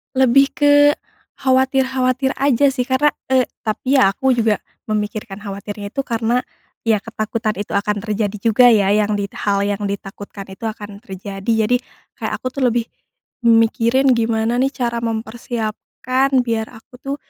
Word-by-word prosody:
Lebih 265 +1 +5
ke 290 0 +4 0.6
khawatir-khawatir 265 0 +1
aja 280 0 +3
sih 255 -2 -2
karna 275 +3 +3 0.2
eee, 260 -1 +3 0.2
tapi 260 +5 +1
ya 255 - +6
aku 265 +4 +1
juga 225 -4 +1 0.2
memikirkan 210 -1 -3
khawatirnya 200 0 -6
itu - - -5
karena 230 +1 +1 0.5
ya 215 -2 +2
ketakutan 220 0 -2
itu 205 - -4
akan 205 +1 0
terjadi 210 -1 -2
juga 235 +3 +5
ya, 205 -2 +3
yang 210 0 +1
dit 200 - -2
hal 200 -1 0
yang 205 0 -2
ditakutkan 200 0 -6
itu 190 +3 -12
akan 210 -1 -6
terjadi, 200 +2 -2
jadi 245 - +3 0.4
kayak - - -4
aku - - -4
tuh 260 +1 -3
lebih 235 0 -1 0.6
mikirin 235 +3 +4
gimana 225 0 0
nih 270 +1 +1
cara 235 -3 -2
mempersiapkan 235 +3 -2
biar 225 -2 -2
aku 225 +3 -16
tuh 275 +1 -3
230 Hz, 150 wpm, -19 LUFS, 210-255 Hz, 0.6 s, ya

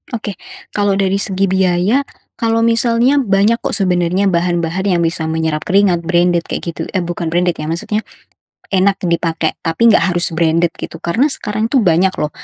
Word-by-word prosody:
Oke. 205 -4 -6 0.3
Kalau 205 -1 0
dari 195 0 0
segi 195 0 +1
biaya, 190 +6 +2 0.4
kalau 230 -1 +1
misalnya 235 +4 +3
banyak, 210 -1 +2
kok, - - -2
sebenarnya 185 0 +1
bahan-bahan 175 +1 -1
yang 180 -3 +1
bisa 165 -1 -1
menyerap 160 -1 -1
keringat, 190 -2 +3
branded, 175 -1 +1
kayak 170 - -4
gitu, - - -6
eh, 185 - +1
bukan 175 0 -4
branded, 175 +2 +1
ya, 155 - -4
maksudnya 170 +6 -2 0.7
enak 195 +1 +1
dipakai, 165 -2 -1
tapi 195 +9 +2
enggak 195 -4 +2
harus 175 +2 +2
branded, 165 +1 +1
gitu, - - -8
karena 225 +12 +1
sekarang, 215 -6 -2
tuh, 250 +1 +2
banyak, 185 0 +2
loh, 150 - -2
185 Hz, 170 wpm, -16 LUFS, 170-205 Hz, 0.7 s, misalnya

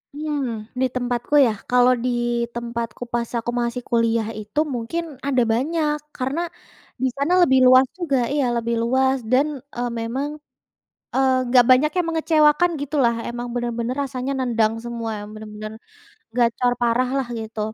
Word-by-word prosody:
Mmm, 270 -8 -3
di 260 - +4
tempatku 245 +2 -2
ya, 225 - +1 0.2
kalau 250 0 +5
di - - +2 0.5
tempatku 235 0 -4
pas 235 -1 -1
aku 240 +1 -3
masih 235 +1 -2
kuliah 230 -1 +2
itu, 210 +7 -3 0.2
mungkin 245 +9 -3 0.2
ada 260 -3 +3
banyak, 300 +4 0 0.2
karena 265 +5 -2 0.6
di - - +4
sana 290 +6 +1
lebih 265 -6 +5
luas 255 +1 +7
juga 285 -7 0 0.2
iya 285 -3 +1
lebih 235 0 -1
luas 265 +2 +2
dan, 270 +4 +4 0.3
eee, 245 0 -2
memang 260 +6 -2 1.2
enggak 245 0 +5
banyak 265 +4 +5
yang 355 -2 +1
mengecewakan 320 +1 +3
gitulah. 275 -5 +1
Emang 240 0 -5
benar-benar 240 0 -2
rasanya 265 0 -3
nendang 230 -4 +1
semua, 235 -1 -4 0.2
benar-benar 215 0 -8 0.6
gacor 245 +1 +2
parah 240 +1 +2
lah 265 - -1
gitu, 220 0 -6
245 Hz, 140 wpm, -22 LUFS, 235-275 Hz, 1.2 s, luas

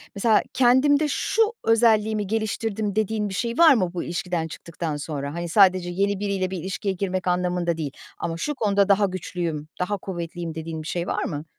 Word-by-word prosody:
mesela 215 +1 +3
kendimde 270 +4 +4
şu 370 +9 0 0.2
özelliğimi 220 -2 +3
geliştirdim 220 -1 -2
dediğin 215 -1 0
bir - - -6
şey 235 +4 -2
var 330 -3 +8
mı 185 -8 0
bu 175 - -3
ilişkiden 175 -1 -2
çıktıktan 165 -1 -5
sonra? 145 -1 -4
Hani, 170 0 -4
sadece 185 -2 +4
yeni 200 +2 0
biriyle 195 -2 -1
bir 190 - -3
ilişkiye 190 +3 -3
girmek 185 -1 -3
anlamında 180 -1 0
değil 150 -4 -3 0.3
ama 165 -1 -3
şu 295 - -2
konuda 205 -5 +2
daha 200 +1 +5
güçlüyüm, 175 -4 -4
daha 205 +3 -1
kuvvetliyim, 170 -3 -5
dediğin 160 0 -5
bir 155 - -8
şey 175 0 -2
var - - -1
mı? 150 -1 -4
185 Hz, 180 wpm, -24 LUFS, 170-215 Hz, 0.3 s, var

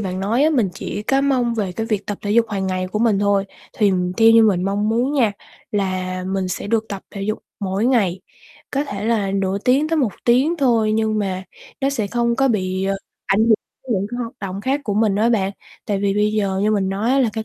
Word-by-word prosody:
bạn 185 -2 -3
nói 225 +7 +1
á, 310 - +4
mình 245 -10 +2
chỉ 205 - -5
có 270 +5 +2
mong 255 -4 +1
về 200 -5 -2
cái 225 +4 -3
việc 215 -3 -2
tập 205 - -4
thể 205 - -2
dục 230 +2 +4
hàng 195 -3 -2
ngày 185 0 -1
của 200 +3 -3
mình 220 -3 +3
thôi. 200 -1 +2 0.3
Thì 205 -3 +4 0.2
theo 225 0 +6
như 225 0 +7
mình 195 -5 +3
mong 205 +2 0
muốn 240 +5 +1
nha, 240 -8 +2 0.4
là 185 -2 -2
mình 190 0 -2
sẽ 180 - -4
được 225 +1 +1
tập 195 -2 -6
thể 200 - -6
dục 215 +2 -2 0.2
mỗi 195 +3 0
ngày, 200 -8 +2 0.5
có 280 +1 0
thể 205 -7 -5
là 215 -4 +1
nửa 195 0 0
tiếng 265 +8 +2
tới 325 - +1
1 255 -9 +1
tiếng 260 +8 +3
thôi 230 -7 +2
nhưng 220 0 +1
mà 190 -2 -2 0.4
nó 275 0 +1
sẽ 230 -7 -1
không 235 +2 0
có 270 0 +3
bị, 190 -4 -1
ờ, 195 0 0 0.3
ảnh 195 - +2
hưởng 220 - +3 0.4
đến - - +1
những 195 +1 -1
cái 240 - -4
hoạt 230 0 -6
động 195 0 -4
khác 270 +6 0
của 205 -4 -1
mình 215 -2 +2
á 220 +3 +3
bạn. 195 -4 +1 0.3
Tại 205 -2 0
vì 200 -1 +1
bây 210 +1 +2
giờ 200 -3 0
như 210 - +2
mình 200 -3 +1
nói 200 +5 -1
á 270 - +3
là 255 -4 +3
cái 220 +1 -4
210 Hz, 250 wpm, -20 LUFS, 195-235 Hz, 0.5 s, như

